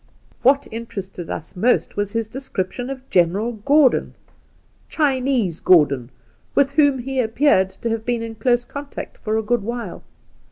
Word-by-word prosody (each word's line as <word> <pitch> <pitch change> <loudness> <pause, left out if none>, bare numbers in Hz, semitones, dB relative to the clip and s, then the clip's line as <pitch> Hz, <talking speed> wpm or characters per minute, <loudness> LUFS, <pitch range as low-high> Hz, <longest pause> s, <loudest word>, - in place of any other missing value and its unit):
What 275 +2 +3
interested 195 -6 -7
us 160 - -6
most 235 +7 +1
was 205 -1 -2
his 230 -1 -1
description 245 -1 -4
of 265 -1 -7
General 190 +6 +2
Gordon 265 +5 +3 0.4
— - - -37
"Chinese 260 - +1
Gordon" 140 -8 +4 0.2
— - - -38
with 275 -1 +3
whom 285 -2 +4
he 265 +1 -3
appeared 225 -4 +3
to 230 - -5
have 225 -1 -2
been 240 -1 -1
in 225 0 -5
close 240 +2 +1
contact 280 +2 -8
for 215 0 -1
a 220 - 0
gpod 240 +3 +1
while. 235 -2 -5
235 Hz, 160 wpm, -21 LUFS, 200-265 Hz, 0.4 s, Gordon